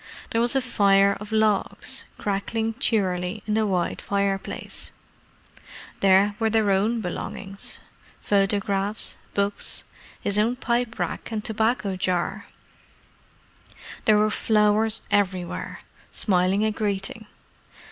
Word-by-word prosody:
There 230 - +2
was 240 +3 +2
a 265 - +2
fire 200 -4 +4
of 210 +1 -9
logs, 215 -2 +1
crackling 220 +3 -1
cheerily 190 -4 0
in 210 - -1
the 220 0 +2
wide 180 -3 -1
fireplace: 200 -1 -2 1.1
there 195 +1 +5
were 225 -1 +2
their 215 -2 +2
own 215 +4 +2
belongings—photographs, 200 +2 -2 0.2
books, 200 0 -1 0.4
his 200 +1 +1
own 230 +4 +2
pipe 240 -2 -1
rack - - -3
and 215 -1 -3
tobacco 220 -2 0
jar: 185 +2 -1 1.6
there 215 -1 +6
were 215 0 +3
flowers 215 +1 +2
everywhere, 185 -3 -1 0.3
smiling 190 +1 +2
a 220 - +2
greeting. 210 0 -2
205 Hz, 105 wpm, -25 LUFS, 195-220 Hz, 1.6 s, there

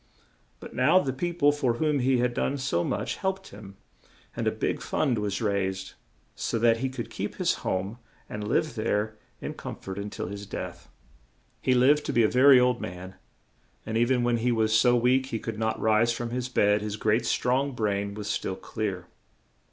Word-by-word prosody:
But - - -10
now 130 +8 +4
the 135 -8 +1
peo 175 +6 -2
ple 145 -4 +4
for 140 -5 0
whom 150 +1 +1
he 130 0 +2
had 120 0 +1
done 140 +3 -1
so 130 -11 0
much - - -2
helped 190 0 -3
him, 100 -2 -12 0.6
and - - -2
a - - +3
big - - -2
fund 125 -7 0
was 105 +1 -2
raised, 95 -2 -1 0.4
so - - -2
that 115 0 +4
he 130 +3 -1
could 120 -3 -6
keep 100 0 -4
his 180 -2 +1
home 95 +5 -2 0.3
and 105 0 -5
live 155 +7 +1
there 110 -1 -1 0.2
in - - -4
com - - -7
fort 95 +1 -7
un 100 +1 -4
til - - -5
his 100 +2 -7
death. 60 - -7 0.7
He 130 - +2
lived 140 +4 +4
to - - -1
be 120 - +4
a - - +5
ver 130 +5 +6
y - - +8
old 125 -1 +3
man, 90 +1 -7 0.7
and 110 - -4
e 115 - +4
ven 125 0 +2
when 120 0 +2
he 120 +2 +1
was 110 -2 +1
so 120 +2 +5
weak 125 +2 +3
he 115 - -3
could 110 -1 -5
not 110 0 -1
rise 110 +2 +3
from 120 0 -4
his 125 +1 -3
bed, 105 -4 +3
his 105 0 -4
great, 110 +2 +1
strong 130 +3 +1
brain 100 -3 -1
was 105 -1 -6
still 95 - -2
clear. 95 -4 -4
115 Hz, 205 wpm, -27 LUFS, 105-130 Hz, 0.7 s, y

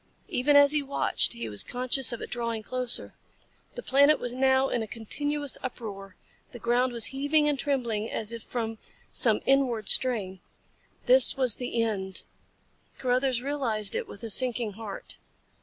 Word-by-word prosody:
Even 285 +4 +1
as 285 0 +7
he 300 -1 +1
watched 280 0 0
he 115 -1 -6
was 105 -2 0
conscious 255 +1 +3
of 235 - -6
it - - -9
drawing 230 -2 -3
closer. 250 +2 0 0.6
The - - -7
planet 285 +3 +4
was 245 -1 -4
now 265 +1 +2
in 240 - -2
a 220 - -5
continuous 290 +6 -3
uproar. 200 -6 -8 0.4
The - - -8
ground 240 +2 0
was 235 -2 -2
heaving 290 +2 +1
and 290 -2 -1
trembling 235 -6 -2
as 220 +1 -3
if 230 - -7
from 225 -1 -5 0.3
some - - +2
inward 255 -6 +1
strain. 205 -8 +3 0.7
This - - +6
was 255 -5 +3
the 240 -2 -2
end. 190 -4 -2 0.7
Carruthers 255 -1 0
realized 235 -8 -1
it - - -3
with 200 - -12
a 225 - -4
sinking 240 -1 +2
heart. 205 -1 -7
245 Hz, 160 wpm, -26 LUFS, 220-270 Hz, 0.7 s, as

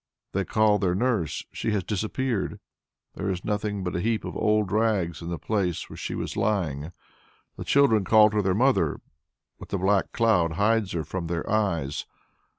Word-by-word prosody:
They - - -1
call 110 -1 +3
their 90 -2 +1
nurse 110 - -1
she - - -3
has 100 -3 0
disappeared; 110 +4 -2 0.5
there 100 - -3
is 90 -1 -3
nothing 105 -1 -2
but 90 - -3
a - - 0
heap 115 +1 0
of - - -6
old 105 -3 +1
rags 100 -8 +1
in 85 - -6
the 85 - -3
place 95 -4 -2
where - - -8
she - - -5
was - - -4
lying. 85 -7 -1 0.6
The - - -6
children 125 -7 +4
call 105 +2 +6
to 105 -1 +1
their 95 -2 +1
mother, 130 +5 +2 0.6
but - - -11
the 100 - -1
black 95 +1 +1
cloud 90 -9 +2
hides 105 +2 +1
her 85 -2 -1
from 90 +1 -4
their 85 -1 -3
eyes. 85 -10 -1
100 Hz, 180 wpm, -26 LUFS, 90-110 Hz, 0.6 s, call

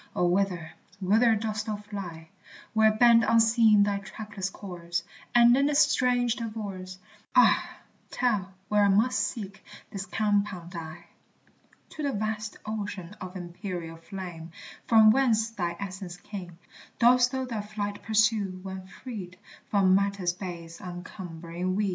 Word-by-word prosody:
O, 180 - +2
whither, 175 -3 0 0.3
whither 220 +4 +4
dost 215 0 -3
thou 215 - -1
fly, 195 -6 -8 0.4
Where 220 -1 +5
bend 230 +1 +6
unseen 225 -2 +5
thy 200 -1 0
trackless 200 -1 -6
course, 175 -4 -5 0.3
And 240 0 +7
in 275 +2 +3
this 295 -1 +1
strange 250 -5 +3
divorce, 200 -5 -6 0.4
Ah, - - +5 0.4
tell 210 -7 0 0.2
where 210 -1 +3
I - - +5
must 220 +6 +3
seek 200 -4 -4 0.3
this 195 0 -5
compound 200 -5 -1
I? 165 0 -8 0.8
To 310 - -8
the 280 -2 -1
vast 215 0 -3
ocean 205 -3 -5
of 185 0 -7
empyreal 175 -2 -6
flame, 175 -3 -7 0.4
From 220 -2 +7
whence 225 -3 +2
thy 175 -5 -3
essence 190 -2 -6
came, 180 -2 -9 0.4
Dost 245 +1 +5
thou 260 -1 -2
thy 230 -4 -3
flight 205 -1 -5
pursue, 210 -3 +1
when 190 -1 -7
freed 195 -5 -8 0.3
From 195 -2 +4
matter's 200 -2 +1
base 170 -2 -8
uncumbering 175 0 -5
weed? 205 0 +1
200 Hz, 135 wpm, -28 LUFS, 180-220 Hz, 0.8 s, And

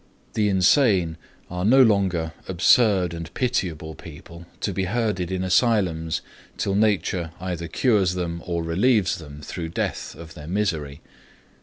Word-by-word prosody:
The 105 -2 +1
insane 95 - +3 0.3
are 90 0 -4
no 130 +6 +6
longer 95 -7 +1
absurd 95 0 +3
and 85 -1 -7
pitiable 85 - -1
people, 85 +2 -12
to 100 - -1
be 95 +1 -1
herded 100 -4 -1
in 95 0 -1
asylums 90 -5 +1 0.4
till 100 - -1
nature 95 -4 +1
either 85 -2 -4
cures 100 -3 +2
them 85 -2 -3
or 85 -1 -1
relieves 95 +3 +2
them, 75 -2 -11
through 80 +2 -5
death, - - -3
of 80 -1 -11
their 75 -3 -10
misery. 80 -7 -2
90 Hz, 140 wpm, -24 LUFS, 85-105 Hz, 0.4 s, no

